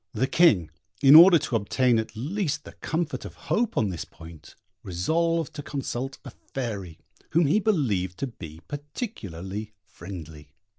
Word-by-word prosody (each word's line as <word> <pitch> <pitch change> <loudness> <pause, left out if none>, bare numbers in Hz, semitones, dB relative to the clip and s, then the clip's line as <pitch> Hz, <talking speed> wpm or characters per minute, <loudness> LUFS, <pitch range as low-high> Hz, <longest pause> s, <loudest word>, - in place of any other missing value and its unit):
The 120 +5 +2
King, 125 - +4 0.3
in 135 +1 +8
order 170 +3 +10
to 135 - -3
obtain 115 +3 +2
at 110 +1 -5
least 150 - -2
the - - -11
comfort 160 -1 -3
of - - -9
hope 230 0 -1
on 105 - +2
this 85 -4 -4
point, 80 -2 -14 0.3
resolved 165 - 0
to 145 - -6
consult 135 -2 -4
a - - -8
fairy, 100 -10 -6 0.4
whom 165 +1 +4
he 155 +9 +3
believed 110 - 0
to - - -2
be 80 - -10
particularly 110 - -6
friendly. 80 -6 -10
125 Hz, 150 wpm, -26 LUFS, -, 0.4 s, order